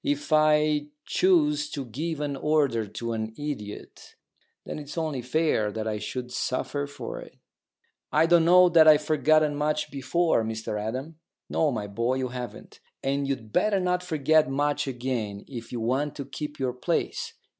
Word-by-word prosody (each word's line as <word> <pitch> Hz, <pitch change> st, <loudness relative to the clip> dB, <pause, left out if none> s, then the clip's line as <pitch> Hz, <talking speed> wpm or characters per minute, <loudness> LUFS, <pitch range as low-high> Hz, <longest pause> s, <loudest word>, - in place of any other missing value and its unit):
If 290 Hz, -, -1 dB
I 150 Hz, -1 st, +3 dB, 0.2 s
choose 150 Hz, -5 st, +2 dB
to 140 Hz, -2 st, -5 dB
give 150 Hz, +6 st, -4 dB
an 145 Hz, -1 st, -2 dB
order 135 Hz, -6 st, +1 dB
to 115 Hz, +3 st, -4 dB
an 110 Hz, 0 st, -4 dB
idiot, 140 Hz, -9 st, -7 dB, 0.5 s
then -, -, -5 dB
it's 145 Hz, +2 st, -9 dB
only 155 Hz, -5 st, -1 dB
fair 125 Hz, -5 st, +1 dB
that 110 Hz, +1 st, -4 dB
I 105 Hz, -1 st, -2 dB
should 125 Hz, +3 st, -5 dB
suffer 130 Hz, +3 st, -2 dB
for 145 Hz, 0 st, -7 dB
it." -, -, -12 dB, 0.7 s
"I 155 Hz, +2 st, +4 dB
don't 170 Hz, 0 st, +5 dB
know 180 Hz, +1 st, +7 dB
that 165 Hz, -2 st, +6 dB
I've 150 Hz, -1 st, +7 dB
forgotten 155 Hz, 0 st, +3 dB
much 150 Hz, +1 st, -1 dB
before, 140 Hz, 0 st, +1 dB
Mr 110 Hz, -1 st, -3 dB
Adam." 130 Hz, +9 st, -5 dB, 0.3 s
"No, 160 Hz, -, +2 dB
my 110 Hz, -5 st, -3 dB
boy, 115 Hz, +5 st, -1 dB
you 130 Hz, -1 st, -2 dB
haven't. 125 Hz, -3 st, -8 dB, 0.2 s
And 140 Hz, +1 st, 0 dB
you'd 115 Hz, -6 st, -4 dB
better 210 Hz, -2 st, +3 dB
not 180 Hz, -1 st, 0 dB
forget 155 Hz, -4 st, +2 dB
much 145 Hz, +1 st, 0 dB
again 120 Hz, -6 st, -3 dB
if 120 Hz, -4 st, -8 dB
you 120 Hz, -, -3 dB
want 130 Hz, +6 st, -1 dB
to 140 Hz, -, -5 dB
keep 150 Hz, +2 st, -6 dB
your 130 Hz, -2 st, -1 dB
place. 175 Hz, -, -2 dB
145 Hz, 165 wpm, -26 LUFS, 120-155 Hz, 0.7 s, know